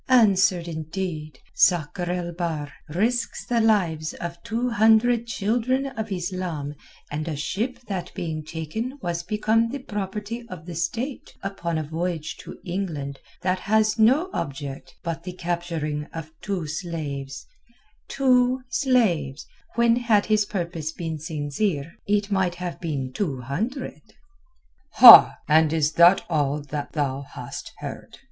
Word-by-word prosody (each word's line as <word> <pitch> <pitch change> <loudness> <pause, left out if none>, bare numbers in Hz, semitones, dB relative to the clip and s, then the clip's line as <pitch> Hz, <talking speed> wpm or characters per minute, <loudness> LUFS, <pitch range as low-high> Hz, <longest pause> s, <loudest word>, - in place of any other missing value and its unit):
"Answered 195 -8 +4
indeed. 160 -1 -5 0.2
Sakr 175 0 +2
el 175 -1 -2
Bahr 160 -5 -3 0.2
risks 230 +9 -1
the 235 -1 +1
lives 175 -8 +1
of 170 0 -6
two 230 +2 -2
hundred 225 +2 +4
children 235 +5 0
of 220 -1 -4
Islam 175 -5 -3 0.4
and 155 +2 -3
a 160 - -2
ship 200 - -2
that 185 -3 -4
being 155 -2 -4
taken 165 - -5
was 175 -1 -1
become 220 +4 +1
the 275 - -4
property 210 0 -5
of 170 -3 -9
the 175 - -7
State 230 - -3
upon 175 -4 -3
a 155 - -1
voyage 160 +1 -3
to - - -10
England 165 -7 -4 0.2
that 185 0 +1
has 215 +2 +2
no 275 - +4
object 135 -3 -5
but 165 -1 -3
the 180 +1 -7
capturing 170 -4 -3
of 160 0 -8
two 195 -5 -3
slaves—two 215 - -2
slaves, 200 - +1 0.3
when 235 0 +4
had 225 -4 +3
his 215 -1 +2
purpose 170 -4 -3
been 160 -2 -5
sincere, 150 +1 -2 0.2
it 205 0 +1
might 190 -3 +1
have 175 -1 -6
been 140 -6 -3
two 140 -9 -2
hundred." 220 - -4 0.9
"Ha! - - +11
And 155 0 +4
is 155 -2 +2
that 175 +4 +6
all 150 -3 0
that 145 0 -5
thou 140 -3 -1
hast 140 - -8
heard?" - - -8
175 Hz, 135 wpm, -24 LUFS, 155-220 Hz, 0.9 s, Ha